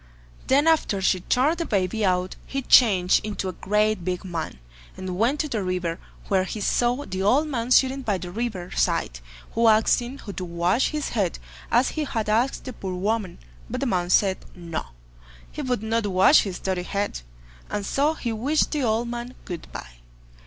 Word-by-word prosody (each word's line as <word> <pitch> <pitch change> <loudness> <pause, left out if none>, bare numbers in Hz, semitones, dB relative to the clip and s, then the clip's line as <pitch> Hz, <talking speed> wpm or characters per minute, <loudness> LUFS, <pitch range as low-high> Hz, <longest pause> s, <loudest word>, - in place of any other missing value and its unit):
Then 280 +3 +4
after 320 -11 +2
she 190 -1 +2
turned 275 - +1
the 335 - -1
baby 200 +1 0
out, 185 -1 +1
he 275 0 -3
changed 195 -8 +5
into 205 -2 -3
a - - -5
great 210 +1 +1
big 180 +1 -3
man, 170 - -4 0.4
and 185 -1 -4
went 240 +9 +1
to 305 - -3
the 230 -7 -2
river, 180 -3 -2 0.3
where 190 -2 +2
he 215 - -5
saw 245 +6 +1
the 185 0 -4
old 265 +10 +3
man 245 -5 -3
sitting 265 +1 +4
by 210 -6 0
the 180 -1 -7
river 200 -4 -4
side, - - 0 0.3
who 230 0 +2
asked 220 +2 +4
him 245 +3 -7
to 200 -7 -7
wash 175 +7 +1
his 300 -2 -3
head, 200 -7 -1 0.3
as 245 +3 +4
he 310 - -2
had 225 -5 -2
asked 235 +5 +1
the 255 - -6
poor 190 -4 -5
woman, 205 0 -1 0.3
but - - -3
the - - -1
man 180 -7 0
said: 190 0 +3 0.2
"No, 170 -3 -5 0.6
he 300 - -5
would 250 -6 -1
not 225 -1 0
wash 190 +9 +6
his 190 -3 -4
dirty 190 -2 -2
head", 200 - -3 0.5
and 205 -1 -3
so 295 +7 +1
he 235 -6 -3
wished 275 +8 +1
the 300 - -1
old 230 -1 +1
man 240 +1 -6
"good 175 -3 -7
bye". - - -9
215 Hz, 190 wpm, -24 LUFS, 185-250 Hz, 0.6 s, wash